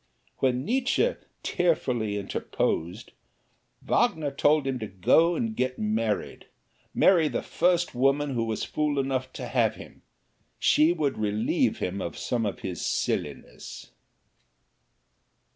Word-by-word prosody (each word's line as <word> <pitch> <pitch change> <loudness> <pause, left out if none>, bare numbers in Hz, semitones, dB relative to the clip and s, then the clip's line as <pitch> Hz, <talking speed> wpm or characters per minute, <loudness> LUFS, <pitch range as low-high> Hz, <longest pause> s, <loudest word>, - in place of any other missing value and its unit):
When 130 0 0
Nietzsche 265 - +1 0.3
tearfully 125 - 0
interposed, 95 0 -3 0.7
Wagner 150 -3 +1
told 145 +1 +2
him 135 -2 -2
to 110 - -4
go 160 - +3
and 225 +1 -2
get 130 -5 -1
married 110 0 -2 0.4
marry 170 -5 +4
the - - -3
first 175 -1 +1
woman 135 +3 +1
who 115 -2 0
was 110 -1 -3
fool 150 -1 -1
enough 130 -1 -1
to - - -6
have - - +1
him - - -13 0.6
she 155 +2 +4
would 150 -8 -1
relieve 105 0 +1
him 95 +2 -3
of 85 - -5
some 115 -3 -1
of 100 - -5
his 90 -2 -5
silliness. - - -4
130 Hz, 125 wpm, -27 LUFS, 110-155 Hz, 0.7 s, marry